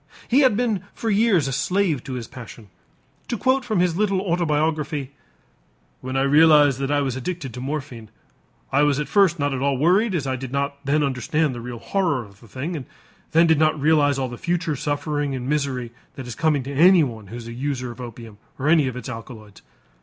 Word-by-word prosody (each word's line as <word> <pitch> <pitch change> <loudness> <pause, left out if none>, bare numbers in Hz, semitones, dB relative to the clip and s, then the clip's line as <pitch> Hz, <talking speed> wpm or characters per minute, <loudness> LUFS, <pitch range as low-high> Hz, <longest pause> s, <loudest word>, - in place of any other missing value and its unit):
He 255 - +4
had 260 -7 +4
been 225 -6 0
for 225 - -2
years 200 -7 +3
a - - -2
slave 180 -2 0
to 135 - -5
his 120 -2 -5
passion. 115 -4 -11 0.6
To 235 - -2
quote 260 +4 +2
from 220 -6 -1
his 180 -2 +1
little 195 -1 +1
autobiography: 155 -5 -1 0.9
"When 130 +1 -4
I 135 - +2
realized 145 -1 +5
that 135 0 -2
I 145 0 +2
was 135 -3 -2
addicted 135 -1 -5
to 125 - -7
morphine, 130 -5 -5 0.6
I 140 - +3
was 145 -1 +2
at 150 - -2
first 195 -4 +3
not 145 -2 -1
at 130 - -3
all 140 -1 +1
worried 185 - +3
as 150 -5 -1
I 130 -1 -1
did 130 -1 -7
not 140 0 -3
then 145 +2 +1
understand 140 +2 0
the 120 - -7
real 120 0 -6
horror 145 - -1
of 100 -1 -18
the 115 - -17
thing, 140 - -5
and 140 -5 -6 0.6
did 160 -2 +3
not 155 0 +4
then 155 - -9
realize 145 -2 +3
all 130 -1 -1
the 120 -1 -9
future 170 -3 -1
suffering 145 0 -2
and 125 -1 -5
misery 135 -5 -1 0.2
that 135 -3 -7
is 125 - -6
coming 155 -3 +1
to 140 +2 -6
anyone 145 - +4
who 110 - -9
is 120 -1 -8
the 115 - -7
user 130 -1 -3
of 120 +2 -10
opium 115 -3 -10 0.2
or 140 - -2
any 155 -4 +4
of 125 - -4
its 125 - -7
alkaloids. 115 -3 -9
145 Hz, 215 wpm, -22 LUFS, 130-165 Hz, 0.9 s, realized